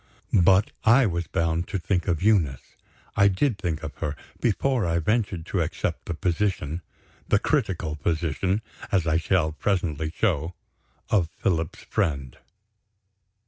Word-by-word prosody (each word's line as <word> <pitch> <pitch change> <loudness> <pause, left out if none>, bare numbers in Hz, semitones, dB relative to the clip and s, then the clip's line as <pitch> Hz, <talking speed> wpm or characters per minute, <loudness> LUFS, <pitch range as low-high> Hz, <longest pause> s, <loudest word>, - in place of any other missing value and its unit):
But 95 +3 +5
I 120 +4 +6
was 85 -4 -1
bound 85 +1 0
to 100 - -2
think 90 +1 -1
of 85 -2 0
Eunice. 85 - +1 0.4
I 100 0 +6
did 100 +3 +1
think 80 -5 -2
of 80 - -5
her, 75 -3 -2 0.2
before 125 +1 +1
I 85 -1 +1
ventured 95 -1 0
to - - -1
accept - - -2
the 85 - -3
position 85 -2 -1 0.5
the - - +4
critical 80 -5 0
position, 85 +6 0 0.3
as 95 -4 +2
I 80 -1 +2
shall 85 -2 +1
presently 80 -3 -1
show 85 -2 0 0.6
of 90 -7 +3
Philip's 80 -4 -1
friend. 70 -5 -2
85 Hz, 140 wpm, -25 LUFS, 80-100 Hz, 0.6 s, I